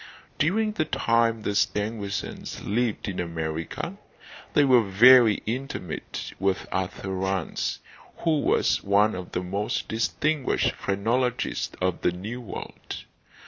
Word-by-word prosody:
During 215 +8 +2
the 210 -7 -1
time 115 -6 +1
the 105 - -1
Stangersons 105 -1 -2
lived 115 +1 -1
in 95 -3 -3
America 80 -2 -4 0.6
they 145 - +6
were 130 -3 +6
very 115 +2 +6
intimate 120 -7 -4
with 95 0 0
Arthur 95 0 -3
Rance, 95 -2 -1 0.4
who 160 -3 +1
was - - +2
one 100 +2 +3
of 90 -1 -7
the 90 - -1
most 100 +4 -2
distinguished 140 +6 0
phrenologists 120 +5 -1
of 95 -1 0
the - - +2
new 105 +8 -6
world. 115 - -7
105 Hz, 120 wpm, -26 LUFS, 95-125 Hz, 0.6 s, they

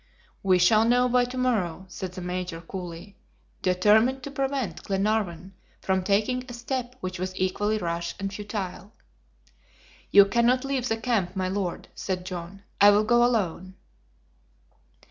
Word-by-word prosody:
"We 185 -2 +4
shall 215 +5 +5
know 245 +2 +3
by 250 0 +3
to 250 +1 -7
morrow," 195 -9 0
said 185 0 -6
the 185 - -7
Major, 180 -1 -4
coolly, 175 +2 -8 0.4
determined 215 +8 +3
to 280 - -6
prevent 270 - -2
Glenarvan 195 -3 -1 0.3
from 190 0 0
taking 215 +6 +1
a - - -7
step 245 +1 -4
which 185 -2 -5
was 185 0 -4
equally 205 +3 0
rash 170 -3 -3
and 195 0 -3
futile. 205 -1 -6 1.2
"You 200 0 +8
cannot 235 +5 +2
leave 270 -2 -1
the 225 - 0
camp, 220 -6 -1
my 185 -1 -1
Lord," 190 -2 -3
said 185 -2 -4
John. 185 +1 -7 0.2
"I 205 - +9
will 205 +1 +4
go 240 +2 +4
alone." 190 -6 0
200 Hz, 145 wpm, -26 LUFS, 185-235 Hz, 1.2 s, I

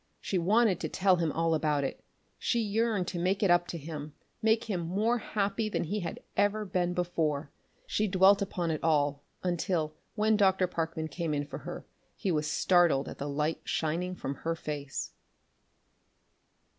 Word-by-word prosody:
She 190 - -1
wanted 205 +1 +3
to 160 - -3
tell 190 +1 +3
him 165 -3 0
all 165 +1 +1
about 150 -2 +1
it; 135 - -4 0.4
she 235 - +1
yearned 215 -3 +1
to 175 - -4
"make 190 +4 +1
it 190 - +4
up 175 0 +4
to 170 - -4
him," 150 -1 -7 0.3
make 220 +1 +3
him 210 -6 -2
more 205 +8 +1
happy 210 +1 -1
than - - -1
he 205 +6 -2
had 175 - -5
ever 205 +1 +2
been 180 -2 0
before. 160 -5 -1 0.3
She 215 - 0
dwelt 195 +1 +5
upon 180 -4 -1
it 155 - -3
all 145 -3 +2 0.2
until, 175 -3 0 0.2
when 215 0 +3
Dr. 190 -2 +4
Parkman 165 -2 -3
came 160 0 -2
in 145 0 -1
for - - -7
her, - - -7 0.3
he 190 - -1
was 155 -1 0
startled 175 -6 +3
at - - -8
the 145 - -3
light 150 +3 -1
shining 170 +4 -1
from 140 - -4
her 165 0 -1
face. 145 -3 -4
175 Hz, 175 wpm, -30 LUFS, 155-200 Hz, 0.4 s, dwelt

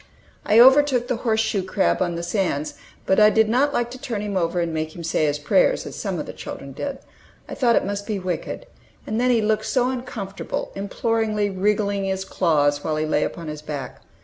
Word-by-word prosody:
I 215 - +5
overtook 260 -1 +6
the 250 -2 -1
horse 225 -2 +1
shoe 220 -3 0
crab 190 +1 0
on 175 -2 0
the 170 - -4
sands, 170 -5 -1 0.3
but 190 - +3
I 210 0 +8
did 220 0 +3
not 260 +6 +2
like 240 -3 -1
to 255 - -8
turn 230 -7 -3
him 205 -1 -4
over 175 -1 0
and 170 -1 -1
make 155 0 -3
him 170 - -7
"say 160 -1 +1
his 145 0 0
prayers," - - +2
as - - -7
some - - -3
of - - -4
the - - -8
children - - -8
did. - - -4 0.5
I - - -7
thought 240 -4 +3
it - - +2
must 200 +1 -4
be 215 -3 -1
wicked. 185 - -4 0.4
And 220 +2 -1
then 250 - +2
he 235 -3 +3
looked 215 0 0
so 255 -1 +1
uncomfortable, 235 -6 -5
imploringly 210 +1 -1
wriggling 200 +1 0
his 190 0 -2
claws 145 -6 +1
while 155 - -1
he 155 0 -1
lay 150 -1 +1
upon 165 -2 -5
his 150 0 -6
back! 145 -3 -6
205 Hz, 220 wpm, -23 LUFS, 170-230 Hz, 0.5 s, I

